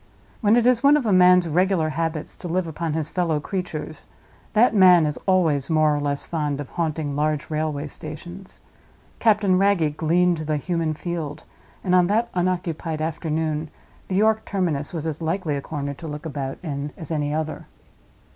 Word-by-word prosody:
When 215 Hz, 0 st, +4 dB
it 240 Hz, -1 st, +3 dB
is 250 Hz, -2 st, +4 dB
one 285 Hz, +2 st, +6 dB
of 280 Hz, -, -2 dB
a 210 Hz, -, +2 dB
man's 180 Hz, -1 st, +6 dB
regular 175 Hz, 0 st, +2 dB
habits 165 Hz, 0 st, -3 dB
to -, -, -7 dB
live 180 Hz, +1 st, 0 dB
upon 160 Hz, 0 st, -3 dB
his 155 Hz, -1 st, -2 dB
fellow 170 Hz, -4 st, 0 dB
creatures, 160 Hz, -3 st, -5 dB, 0.5 s
that 225 Hz, +3 st, +4 dB
man 180 Hz, -5 st, +7 dB
is 150 Hz, -1 st, -2 dB
always 160 Hz, -8 st, +2 dB
more 155 Hz, -2 st, +3 dB
or -, -, -1 dB
less 145 Hz, -1 st, -2 dB
fond 150 Hz, -4 st, -2 dB
of 145 Hz, -, -7 dB
haunting 155 Hz, -4 st, -2 dB
large 150 Hz, +1 st, -1 dB
railway 155 Hz, -1 st, -1 dB
stations. 175 Hz, +6 st, -9 dB, 0.6 s
Captain 205 Hz, -4 st, +3 dB
Wragge 185 Hz, -7 st, +2 dB
gleaned 170 Hz, +2 st, +2 dB
the 155 Hz, -1 st, -1 dB
human 165 Hz, 0 st, -1 dB
field, 155 Hz, -3 st, -5 dB, 0.4 s
and 180 Hz, -, 0 dB
on 180 Hz, -1 st, +5 dB
that 225 Hz, +4 st, +1 dB
unoccupied 175 Hz, -3 st, -1 dB
afternoon 155 Hz, -1 st, -2 dB, 0.4 s
the 185 Hz, -, -2 dB
York 220 Hz, +2 st, +3 dB
terminus 165 Hz, -7 st, -2 dB
was 165 Hz, -3 st, -4 dB
as 160 Hz, 0 st, -3 dB
likely 165 Hz, -1 st, -1 dB
a 140 Hz, -, -3 dB
corner 140 Hz, -1 st, -4 dB
to 160 Hz, +4 st, -9 dB
look 150 Hz, +1 st, -6 dB
about 140 Hz, -3 st, -4 dB
in 145 Hz, -2 st, -4 dB
as 160 Hz, -2 st, -8 dB
any 145 Hz, -2 st, -1 dB
other. 155 Hz, 0 st, -3 dB
160 Hz, 175 wpm, -23 LUFS, 150-185 Hz, 0.6 s, man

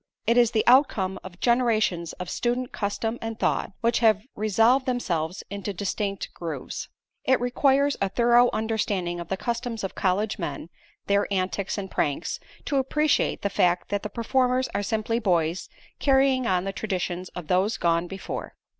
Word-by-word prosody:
It 235 Hz, -, +3 dB
is 240 Hz, -2 st, +5 dB
the 220 Hz, -2 st, +1 dB
outcome 225 Hz, -8 st, +4 dB
of 185 Hz, -1 st, -11 dB
generations 220 Hz, -8 st, +1 dB
of 180 Hz, -, -7 dB
student 245 Hz, +4 st, -1 dB
custom 225 Hz, +3 st, -2 dB
and 225 Hz, -1 st, -4 dB
thought, -, -, 0 dB
which 235 Hz, 0 st, +2 dB
have 215 Hz, -3 st, +4 dB
resolved 225 Hz, +6 st, +3 dB
themselves 180 Hz, -9 st, -1 dB
into 200 Hz, 0 st, -4 dB
distinct 200 Hz, +1 st, -3 dB
grooves. 160 Hz, -6 st, -6 dB, 0.3 s
It 260 Hz, 0 st, +3 dB
requires 275 Hz, +3 st, +2 dB
a 195 Hz, -, +1 dB
thorough 240 Hz, +3 st, +4 dB
understanding 205 Hz, -6 st, -1 dB
of 170 Hz, -, -6 dB
the 190 Hz, -, -2 dB
customs 235 Hz, 0 st, -3 dB
of 195 Hz, -, -3 dB
college 205 Hz, +3 st, 0 dB
men, 165 Hz, 0 st, -5 dB, 0.3 s
their 200 Hz, 0 st, +1 dB
antics 190 Hz, +1 st, -1 dB
and 190 Hz, -2 st, -5 dB
pranks, 145 Hz, -2 st, -1 dB, 0.3 s
to 280 Hz, -, 0 dB
appreciate 300 Hz, +3 st, +1 dB
the 200 Hz, -, +1 dB
fact 175 Hz, 0 st, +2 dB
that 205 Hz, 0 st, -1 dB
the 210 Hz, -, -5 dB
performers 255 Hz, +3 st, +1 dB
are -, -, 0 dB
simply 220 Hz, +2 st, -1 dB
boys, 175 Hz, -5 st, 0 dB, 0.3 s
carrying 265 Hz, -2 st, +3 dB
on 180 Hz, -3 st, +2 dB
the 195 Hz, 0 st, -3 dB
traditions 185 Hz, -3 st, -3 dB
of 180 Hz, -, -6 dB
those 190 Hz, +5 st, +2 dB
gone 170 Hz, 0 st, +1 dB
before. 195 Hz, +1 st, -6 dB
210 Hz, 165 wpm, -25 LUFS, 185-240 Hz, 0.3 s, is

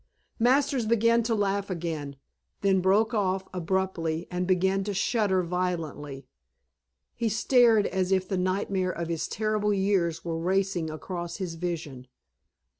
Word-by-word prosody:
Masters 260 Hz, 0 st, +2 dB
began 230 Hz, +1 st, +3 dB
to 230 Hz, 0 st, 0 dB
laugh 200 Hz, -1 st, 0 dB
again, 160 Hz, -5 st, -4 dB, 0.5 s
then 195 Hz, -2 st, +3 dB
broke 205 Hz, +5 st, +3 dB
off 190 Hz, -3 st, 0 dB
abruptly 175 Hz, -2 st, -1 dB
and 180 Hz, 0 st, -2 dB
began 190 Hz, +1 st, +2 dB
to 205 Hz, -1 st, -3 dB
shudder 200 Hz, -2 st, +1 dB
violently. 165 Hz, -6 st, -3 dB, 0.9 s
He 230 Hz, -2 st, -1 dB
stared 225 Hz, -1 st, +4 dB
as 185 Hz, 0 st, -1 dB
if 190 Hz, -1 st, +2 dB
the 195 Hz, -, -1 dB
nightmare 185 Hz, 0 st, 0 dB
of 170 Hz, -1 st, -5 dB
his 165 Hz, -2 st, -2 dB
terrible 215 Hz, -1 st, 0 dB
years 185 Hz, -4 st, 0 dB
were 165 Hz, -1 st, -2 dB
racing 185 Hz, -1 st, 0 dB
across 170 Hz, +2 st, -5 dB
his 185 Hz, -4 st, -4 dB
vision. 160 Hz, -7 st, -5 dB
190 Hz, 135 wpm, -27 LUFS, 170-205 Hz, 0.9 s, stared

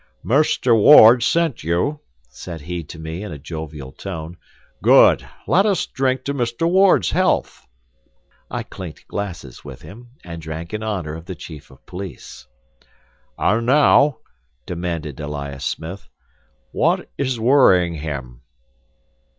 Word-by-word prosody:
"Mr. 130 Hz, -3 st, +2 dB
Ward 115 Hz, +1 st, +8 dB
sent 165 Hz, 0 st, 0 dB
you," 90 Hz, -, -1 dB, 0.3 s
said 80 Hz, +7 st, -9 dB
he 85 Hz, +3 st, -5 dB
to 75 Hz, -, -11 dB
me 80 Hz, +3 st, -6 dB
in 105 Hz, -, -7 dB
a 75 Hz, -, -7 dB
jovial 75 Hz, -2 st, -8 dB
tone. 80 Hz, +1 st, -7 dB, 0.5 s
"Good; -, -, +5 dB, 0.2 s
let 185 Hz, -, +3 dB
us 200 Hz, -3 st, +1 dB
drink 130 Hz, -1 st, -1 dB
to 140 Hz, -, -3 dB
Mr. 120 Hz, +4 st, -1 dB
Ward's 190 Hz, +2 st, +4 dB
health." 185 Hz, -, 0 dB, 0.8 s
I -, -, -4 dB
clinked 90 Hz, -5 st, -10 dB
glasses 85 Hz, -10 st, -6 dB
with -, -, -11 dB
him, 120 Hz, +5 st, -12 dB, 0.2 s
and 85 Hz, -1 st, -8 dB
drank 80 Hz, +3 st, -7 dB
in 110 Hz, -, -3 dB
honor 95 Hz, -8 st, -3 dB
of 80 Hz, +1 st, -9 dB
the 95 Hz, -, -7 dB
chief 75 Hz, -2 st, -11 dB
of 65 Hz, -1 st, -20 dB
police. 95 Hz, 0 st, -9 dB, 0.9 s
"And 115 Hz, +2 st, +1 dB
now," 145 Hz, +1 st, +4 dB, 0.5 s
demanded 85 Hz, -5 st, -5 dB
Elias 70 Hz, -2 st, -6 dB
Smith, 85 Hz, +5 st, -6 dB, 0.6 s
"what -, -, 0 dB
is 130 Hz, -4 st, -1 dB
worrying 110 Hz, -9 st, +4 dB
him?" 70 Hz, -6 st, -6 dB
90 Hz, 135 wpm, -20 LUFS, 80-125 Hz, 0.9 s, Ward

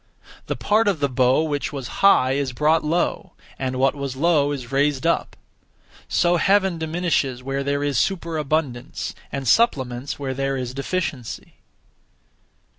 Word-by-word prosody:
The -, -, -1 dB
(part 215 Hz, +1 st, +2 dB
of 195 Hz, -6 st, +1 dB
the 140 Hz, -, +2 dB
bow) 130 Hz, +3 st, +2 dB
which 145 Hz, -2 st, -2 dB
was 135 Hz, -4 st, -5 dB
high 165 Hz, -10 st, +5 dB
is 135 Hz, -1 st, -1 dB
brought 155 Hz, +5 st, +2 dB
low, 165 Hz, +3 st, -1 dB, 0.3 s
and 130 Hz, -1 st, -2 dB
what 135 Hz, +1 st, +2 dB
was 140 Hz, -2 st, -5 dB
low 145 Hz, -1 st, +2 dB
is 125 Hz, -5 st, -6 dB
raised 140 Hz, +1 st, +1 dB
up. 170 Hz, -, 0 dB, 0.7 s
(So 175 Hz, 0 st, +2 dB
Heaven) 190 Hz, -1 st, +2 dB
diminishes 160 Hz, -6 st, -1 dB
where 135 Hz, +1 st, -2 dB
there 140 Hz, +1 st, -1 dB
is 140 Hz, -5 st, +1 dB
superabundance, 155 Hz, -8 st, -2 dB, 0.2 s
and 135 Hz, -2 st, -4 dB
supplements 130 Hz, -, +1 dB
where 135 Hz, -2 st, -3 dB
there 135 Hz, +1 st, -1 dB
is 125 Hz, -1 st, -4 dB
deficiency. 140 Hz, -4 st, -4 dB
140 Hz, 145 wpm, -22 LUFS, 130-165 Hz, 0.7 s, high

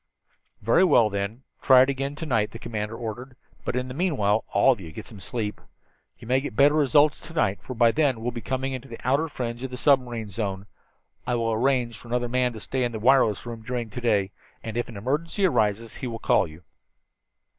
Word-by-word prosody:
"Very 115 Hz, -, +4 dB
well, 120 Hz, -, +4 dB
then, 100 Hz, +5 st, -3 dB, 0.2 s
try 130 Hz, -1 st, +7 dB
it 130 Hz, -, -1 dB
again 135 Hz, +1 st, -3 dB
to 160 Hz, -, -6 dB
night," 110 Hz, -7 st, +1 dB
the 115 Hz, -, -9 dB
commander 110 Hz, -1 st, -4 dB
ordered. 120 Hz, +3 st, -6 dB, 0.3 s
"But -, -, -3 dB
in 125 Hz, 0 st, -1 dB
the 125 Hz, -, -6 dB
meantime 130 Hz, -, +1 dB
all 135 Hz, -, +5 dB
of 120 Hz, -6 st, -2 dB
you 80 Hz, -3 st, -9 dB
get -, -, -8 dB
some 105 Hz, -, -11 dB
sleep. 105 Hz, -1 st, -4 dB, 0.6 s
You -, -, -13 dB
may 130 Hz, +2 st, +2 dB
get 135 Hz, -6 st, -6 dB
better 140 Hz, +5 st, +5 dB
results 150 Hz, 0 st, +4 dB
to 165 Hz, -, -12 dB
night, 105 Hz, -9 st, +1 dB
for 130 Hz, -, -7 dB
by 115 Hz, 0 st, +5 dB
then 145 Hz, -1 st, +2 dB
we 110 Hz, -, -10 dB
will 125 Hz, -, -1 dB
be 120 Hz, -, -6 dB
coming 130 Hz, 0 st, -3 dB
to 135 Hz, -, -15 dB
the 115 Hz, -, -8 dB
outer 140 Hz, +6 st, +2 dB
fringe 120 Hz, -5 st, -5 dB
of 130 Hz, -, -4 dB
the 125 Hz, -, -7 dB
submarine 125 Hz, -7 st, +1 dB
zone. 100 Hz, -2 st, -3 dB, 0.6 s
I 125 Hz, -, +1 dB
will 115 Hz, -1 st, 0 dB
arrange 120 Hz, -1 st, +1 dB
for -, -, -13 dB
another 120 Hz, 0 st, -1 dB
man 125 Hz, 0 st, +1 dB
to 110 Hz, -, -8 dB
stay 130 Hz, +4 st, -2 dB
in 120 Hz, -1 st, -1 dB
the 110 Hz, -, -4 dB
wireless 120 Hz, -3 st, +3 dB
room 115 Hz, -1 st, -7 dB
during 120 Hz, -1 st, -4 dB
to 125 Hz, -, -6 dB
day, 105 Hz, -5 st, +1 dB, 0.3 s
and 110 Hz, -1 st, -6 dB
if 120 Hz, +1 st, -2 dB
an 115 Hz, -, -9 dB
emergency 155 Hz, -, -1 dB
arises 110 Hz, -, 0 dB
he 130 Hz, -, -4 dB
will 115 Hz, -1 st, -4 dB
call 110 Hz, -, +2 dB
you." 80 Hz, +2 st, -14 dB
120 Hz, 230 wpm, -25 LUFS, 110-130 Hz, 0.6 s, try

